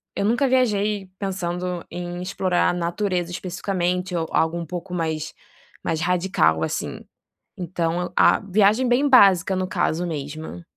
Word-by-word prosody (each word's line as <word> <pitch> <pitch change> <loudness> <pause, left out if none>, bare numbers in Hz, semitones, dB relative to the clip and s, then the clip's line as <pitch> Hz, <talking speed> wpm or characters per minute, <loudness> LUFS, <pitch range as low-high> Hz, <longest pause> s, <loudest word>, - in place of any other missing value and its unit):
eu 200 - -1
nunca 240 +6 +2
viajei 210 -6 +1
pensando 180 -2 -3
em 175 0 -5
explorar 185 -1 +1
a - - 0
natureza 175 0 -2
especificamente 180 0 -2
ou 165 -1 -1
algo 160 +1 +1
um 170 - -4
pouco 180 +2 -6
mais 160 -3 -2 0.5
mais 160 -1 -1
radical 175 - +2
assim, - - -3 0.6
então 175 -1 -2
a - - +5
viagem 210 +5 +2
bem 265 +4 +3
básica 195 -6 +6
no 185 0 -1
caso 170 -1 0
mesmo. 155 +2 -6
180 Hz, 140 wpm, -23 LUFS, 170-195 Hz, 0.6 s, básica